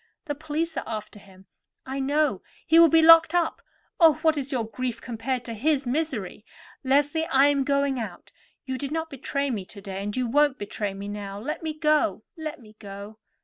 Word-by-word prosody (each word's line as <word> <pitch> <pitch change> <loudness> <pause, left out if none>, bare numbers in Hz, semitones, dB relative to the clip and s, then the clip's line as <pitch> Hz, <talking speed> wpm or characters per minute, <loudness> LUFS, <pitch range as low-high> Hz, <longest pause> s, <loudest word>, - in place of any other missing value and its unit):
The 295 - -2
police 315 +2 -3
are - - -1
after 215 -1 -6
him, 190 -1 -18 0.4
I 265 +1 -4
know; 280 -5 +1 0.2
he 325 +1 +5
will 335 -1 +8
be 325 +1 +5
locked 330 0 +8
up. 345 -2 0 0.4
Oh! 325 -3 +7
what 320 -1 +4
is 280 -1 -3
your 245 -4 -1
grief 250 +2 -4
compared 245 +1 -4
to 230 - -5
his 275 +5 0
misery? 245 - -3 0.4
Leslie, 290 +4 +2
I 275 -2 +4
am 280 -1 +1
going 280 -1 +1
out; 205 -6 -7 0.3
you 260 -1 -4
did 280 0 -4
not 320 0 -3
betray 280 +1 -2
me 210 -5 -3
to 200 - -12
day, 195 -1 -6
and 205 +3 -4
you 255 - +1
won't 290 +3 +2
betray 205 -1 -4
me 200 +1 -7
now. 205 -1 -6
Let 285 +8 -4
me 315 -1 -4
go, 305 -1 +1
let 315 -2 -6
me 215 -3 -17
go." 200 +1 -10
270 Hz, 200 wpm, -25 LUFS, 215-305 Hz, 0.4 s, will